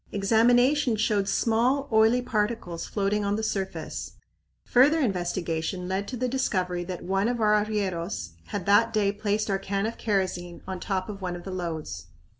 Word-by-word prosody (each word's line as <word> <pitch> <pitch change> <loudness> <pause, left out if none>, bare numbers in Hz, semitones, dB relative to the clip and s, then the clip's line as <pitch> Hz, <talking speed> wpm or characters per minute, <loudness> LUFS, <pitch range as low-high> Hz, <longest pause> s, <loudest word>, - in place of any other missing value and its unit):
Examination 240 +6 +3
showed 210 -2 +1
small, 245 +7 +2
oily 220 +3 +4
particles 210 -7 -2
floating 205 0 0
on 200 0 0
the 220 - -3
surface. 195 -3 -3 0.5
Further 285 +6 +5
investigation 180 - -1
led 190 +2 -2
to 250 - -5
the 255 +2 0
discovery 185 -9 -1
that 180 -1 -6
one 195 +3 +1
of 240 0 -1
our 210 -1 +4
arrieros 175 - -3 0.2
had 200 -4 -4
that 225 +3 +4
day 205 -2 +2
placed 210 +1 -1
our 195 - +1
can 195 +1 -2
of 225 - -4
kerosene 185 -4 -2
on 190 -1 -5
top 185 -1 -2
of 200 -2 -7
one 180 -1 -3
of 175 - -8
the 190 - -6
loads. 160 - -5
200 Hz, 170 wpm, -26 LUFS, 185-225 Hz, 0.5 s, Further